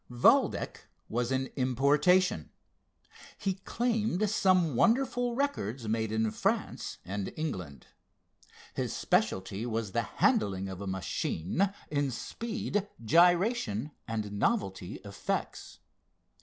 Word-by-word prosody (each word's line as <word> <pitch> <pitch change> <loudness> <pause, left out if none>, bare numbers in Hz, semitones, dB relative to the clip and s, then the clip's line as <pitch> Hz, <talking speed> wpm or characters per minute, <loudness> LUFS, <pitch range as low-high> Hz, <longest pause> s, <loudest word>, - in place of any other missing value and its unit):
Valdec 120 0 +2 0.2
was 120 +2 -1
an 130 0 +1
importation. 145 +8 +3 0.9
He 195 - 0
claimed 215 0 0
some 185 - +3
wonderful 245 - +2
records 135 - -2
made 110 0 0
in 110 0 +1
France - - -1
and 100 +1 -3
England. 90 - -4 0.9
His - - -2
specialty 95 +2 0
was 110 -3 -2
the - - +1
handling 95 -2 +1
of 95 0 -7
a 100 - -5
machine 95 - -1 0.2
in 145 -2 +1
speed, 210 - -3 0.2
gyration 175 - +3 0.2
and 110 -2 -3
novelty 100 - -1
effects. 100 -1 -4
130 Hz, 100 wpm, -30 LUFS, -, 0.9 s, importation